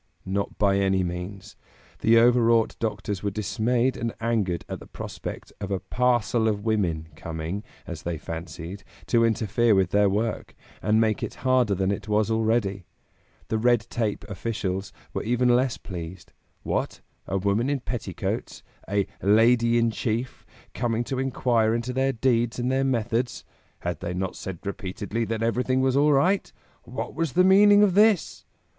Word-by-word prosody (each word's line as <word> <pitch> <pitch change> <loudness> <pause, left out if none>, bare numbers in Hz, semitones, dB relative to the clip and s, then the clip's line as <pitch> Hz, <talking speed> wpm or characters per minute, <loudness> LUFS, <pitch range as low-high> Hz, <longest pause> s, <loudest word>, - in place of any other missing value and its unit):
Not 100 +1 -2
by 100 -1 +3
any 95 -1 +2
means! 90 +3 -6 0.4
The 115 +1 +4
overwrought 115 -1 +4
doctors 105 -3 -3
were 105 - -1
dismayed 110 +6 0
and 115 -1 -3
angered 110 -7 -1
at - - -5
the - - -13
prospect - - -7
of 100 - -4
a 95 -2 -1
"parcel 120 +2 +1
of 105 -1 -1
women" 85 -8 0
coming 80 +6 -5 0.2
as - - -7
they 85 -1 -3
fancied 85 +4 -7 0.2
to 115 -1 +3
interfere 115 0 +2
with 95 -2 +2
their 100 0 +4
work, 110 +3 -2 0.3
and 105 +3 +2
make 110 -2 +1
it - - -4
harder 125 -5 +3
than 95 +1 0
it 100 0 -4
was 105 +1 +1
already. 110 -4 0 0.6
The 110 - 0
red 120 0 +3
tape 110 -3 -1
officials 100 -2 -3 0.2
were - - -2
even 125 +2 +1
less 130 0 +1
pleased. 90 -2 -8 0.3
What? - - -2 0.3
A 95 - -1
woman 100 +6 +1
in 145 -1 0
petticoats, 115 -8 -4 0.3
a 100 -1 +1 0.2
"Lady 115 +3 +4
in 115 -1 +2
Chief," 115 +3 -3 0.3
coming 120 -1 -1
to 130 +2 -3
inquire 120 -4 +1
into 120 +2 -3
their 135 +1 +1
deeds 120 -1 +1
and 125 +1 0
their 135 +1 +1
methods? 120 -1 -1 0.4
Had 85 -3 -3
they 90 - -4
not 95 0 -3
said 95 0 -7
repeatedly 100 +3 -3
that 115 0 -2
everything 125 +3 +1
was 130 0 +2
all 145 +2 +4
right? 180 +8 +2 0.3
What 125 +3 -5
was 160 -4 -2
the 180 - +5
meaning 205 +2 +7
of 200 -3 +3
this? 190 - +3
110 Hz, 165 wpm, -25 LUFS, 100-120 Hz, 0.6 s, meaning